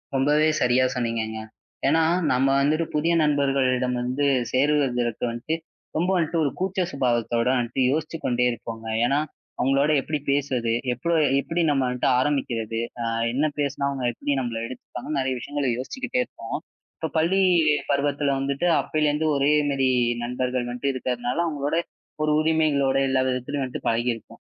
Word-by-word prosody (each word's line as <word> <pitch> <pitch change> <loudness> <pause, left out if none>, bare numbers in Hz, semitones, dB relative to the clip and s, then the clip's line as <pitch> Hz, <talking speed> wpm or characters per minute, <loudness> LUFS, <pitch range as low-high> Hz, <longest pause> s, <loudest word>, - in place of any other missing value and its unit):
ரொம்பவே 150 +3 +3
சரியா 125 +1 +3
சொன்னீங்கங்க. 115 -2 -2 0.5
ஏன்னா, 160 +4 +4 0.3
நம்ம 130 +2 +3
வந்துட்டு 155 +4 +2
புதிய 165 +3 +2
நண்பர்களிடம் 135 -4 +1
வந்து 130 +4 -1 0.3
சேருவதற்கு 130 -4 +1
வந்துட்டு, 120 +7 -3 0.4
ரொம்ப 175 +4 +1
வந்துட்டு 165 -1 0
ஒரு 140 - 0
கூச்ச 190 0 -1
சுபாவத்தோட 120 -3 0
வந்துட்டு 125 +2 -1
யோசுச்சு 155 +2 -2
கொண்டே 125 0 +2
இருப்போங்க. 115 -1 -7 0.2
ஏன்னா, 140 +4 +2 0.4
அவங்களோட 135 +3 +2
எப்படி 150 +2 -3
பேசுறது, 130 -5 0 0.2
எப்பளோ 165 +8 -1 0.3
எப்படி 170 +4 -2
நம்ம 135 -3 +1
கிட்ட 125 - -2
ஆரம்பிக்கிறது, 120 -5 -1 0.2
ஆ, - - -1 0.3
என்ன 145 +4 +1
பேசினா 140 0 0
அவங்க 135 -3 -3
எப்படி 145 - -2
நம்மள 120 -3 -3
எடுத்துப்பாங்கன்னு, 130 +3 -5
நெறைய 130 -1 0
விஷயங்களை 145 0 -2
யோசிச்சுக்கிட்டே 255 - -2
இருப்போம். - - -6 0.4
இப்ப 160 - -3
இ - - -33
பள்ளி 175 +5 +3 0.5
பருவத்துல 140 0 +1
வந்துட்டு, 140 +4 -1 0.2
அப்பயில 155 -1 0
இருந்து 155 +2 0
ஒரே 140 +1 +3 0.2
மாரி 135 -1 +2 0.3
நண்பர்கள் 125 0 -2
மட்டும் 125 +3 -1
இருக்கறதுனால, 125 -1 -2
அவங்களோட 145 -1 -2 0.5
ஒரு 155 - +2
உரிமைகள்யோட, 155 -4 +2
எல்லாவிதத்துலயும் 130 +1 0
வந்துட்டு 130 - -5
பழகி 120 +2 +1
இருப்போம். 115 - -15
135 Hz, 145 wpm, -24 LUFS, 125-150 Hz, 0.5 s, ஏன்னா